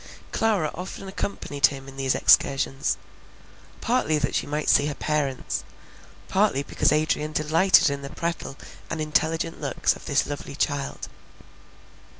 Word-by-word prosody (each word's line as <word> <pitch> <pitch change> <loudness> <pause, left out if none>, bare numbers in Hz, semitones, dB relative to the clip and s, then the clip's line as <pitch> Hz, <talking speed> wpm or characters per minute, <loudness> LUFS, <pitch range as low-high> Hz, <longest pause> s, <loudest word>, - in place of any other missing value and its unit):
Clara 205 -9 +1
often 185 +2 -7
accompanied 145 -8 0
him 135 -1 -8
in 135 - -11
these 135 -1 0
excursions; 135 0 +3 0.8
partly 235 -10 +1
that 145 - -1
she - - -1
might 150 +1 -2
see 145 - +5
her 145 - -3
parents, 145 -4 -2 0.6
partly 190 -8 +2
because - - +1
Adrian 155 0 0
delighted 160 +2 +4
in 140 0 -4
the 140 - -7
prattle, 170 -4 -4 0.3
and - - -3
intelligent 160 +2 0
looks 140 -4 +1
of - - -13
this 145 -2 +2
lovely 145 -1 -6
child. 145 -1 -2
150 Hz, 140 wpm, -25 LUFS, 140-165 Hz, 0.8 s, see